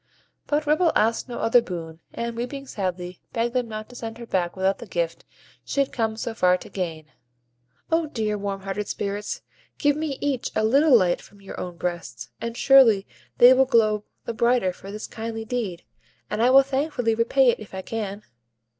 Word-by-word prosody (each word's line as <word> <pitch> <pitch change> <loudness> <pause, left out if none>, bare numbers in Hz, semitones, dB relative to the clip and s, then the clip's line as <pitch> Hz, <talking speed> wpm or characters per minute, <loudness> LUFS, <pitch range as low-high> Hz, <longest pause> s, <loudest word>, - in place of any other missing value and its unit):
But 295 +1 0
Ripple 310 +3 +3
asked 225 +4 +1
no 240 - -5
other 235 +2 +4
boon, 165 -5 -7
and, 235 0 -4
weeping 260 +4 -5
sadly, 180 -5 -4
begged 235 +1 0
them 250 -2 0
not 215 0 -6
to 245 - -13
send 225 -1 -6
her 235 - -8
back 180 -5 -1
without 190 +1 +1
the 235 - -9
gift 170 -3 -2 0.4
she - - -3
had 275 - +2
come 220 -2 -1
so 230 0 -3
far 180 -4 +3
to - - -12
gain. 165 -5 -4 0.9
"O 325 -1 +2
dear, 215 -6 -2
warm 200 -1 -4
hearted 195 +1 -4
Spirits! 205 +1 -4 0.3
give 290 -1 +2
me 300 -3 -3
each 275 -4 -1
a 215 - +2
little 270 +4 +6
light 180 -4 +1
from 200 - -18
your 195 - -9
own 175 -1 -6
breasts, 145 -11 -5
and 230 0 -4
surely 235 -8 +6 0.3
they 245 +1 +9
will 265 +1 +4
glow 215 -4 +3 0.2
the 235 - -3
brighter 235 -5 +2
for 195 +2 -10
this 215 +1 -6
kindly 225 0 -5
deed; 215 -8 -3 0.5
and 210 - -1
I 245 - +5
will 270 +1 +8
thankfully 270 -3 0
repay 240 +3 +4
it - - -5
if 205 -3 -10
I 190 - -5
can." 210 -2 -4
225 Hz, 195 wpm, -24 LUFS, 195-250 Hz, 0.9 s, they